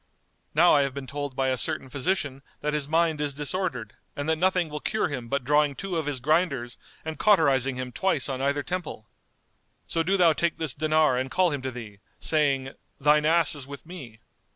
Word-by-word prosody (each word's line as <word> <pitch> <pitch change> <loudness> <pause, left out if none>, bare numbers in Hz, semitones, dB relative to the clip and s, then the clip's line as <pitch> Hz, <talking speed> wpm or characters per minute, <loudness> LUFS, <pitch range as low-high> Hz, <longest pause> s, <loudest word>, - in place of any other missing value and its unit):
Now 170 +3 +6
I 145 - +5
have 140 -1 -2
been 140 -1 -5
told 145 0 -5
by 135 0 +1
a 130 -1 -1
certain 155 -4 -2
physician 145 -1 -2 0.2
that 150 0 -1
his 150 -2 0
mind 160 -1 +1
is 145 -2 -1
disordered 150 - -2 0.2
and 145 +1 -4
that 160 - +2
nothing 185 -1 +2
will 150 0 -5
cure 215 +6 -1
him 125 -5 -5
but 140 +2 -1
drawing 150 +1 +2
two 195 +2 -4
of 160 -3 -2
his 145 -3 -2
grinders 140 -4 0 0.3
and 160 0 -5
cauterising 140 - +3
him 130 0 -5
twice 170 -1 0
on 135 -2 -3
either 140 +1 0
temple. 170 -8 -5 0.8
So 165 - -1
do 190 +4 +1
thou 170 -3 +5
take 170 +1 -1
this 160 -5 -1
dinar 155 -3 +2
and 130 +1 -3
call 180 +3 +2
him 145 -2 -3
to 130 - -3
thee, 110 -5 -9 0.2
saying, 140 -4 +1 0.3
'Thine 150 +2 +4
ass 165 -1 +5
is 140 -3 -5
with 140 +2 -9
me. 135 -11 -10
145 Hz, 205 wpm, -26 LUFS, 135-165 Hz, 0.8 s, Now